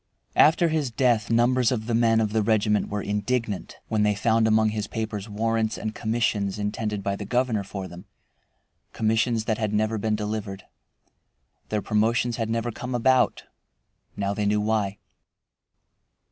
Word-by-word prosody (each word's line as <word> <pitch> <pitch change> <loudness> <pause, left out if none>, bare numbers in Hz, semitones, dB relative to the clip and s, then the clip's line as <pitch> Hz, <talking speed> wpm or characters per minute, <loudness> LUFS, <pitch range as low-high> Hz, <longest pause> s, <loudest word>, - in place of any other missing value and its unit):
After 165 +2 +5
his 155 -4 0
death 120 -3 +1
numbers 120 +1 +3
of 110 -4 -2
the 120 - -2
men 115 -1 +3
of 110 -2 0
the 110 - +2
regiment 105 0 +1
were 105 0 -3
indignant, 105 0 -2
when 110 -1 0
they 105 0 +2
found 110 +2 +2
among 110 0 +3
his 105 -1 -3
papers 110 -2 -4
warrants 110 +1 -1
and 110 0 -4
commissions 110 -3 -1
intended 105 0 -3
by 100 0 -1
the 105 - -6
governor 120 -1 0
for 95 -1 -6
them, 90 0 -11 0.9
commissions 110 +1 +1
that 110 -1 -1
had 105 -1 -1
never 110 +1 0
been 110 +1 0
delivered. 105 -2 -4 1.1
Their 105 -2 -1
promotions 115 +2 +1
had 115 -2 -2
never 115 +1 -1
come 125 +3 -5
about. 130 +2 +2 0.7
Now 100 0 -1
they 105 0 -1
knew 105 +1 +2
why. 105 -2 0
110 Hz, 160 wpm, -25 LUFS, 105-115 Hz, 1.1 s, After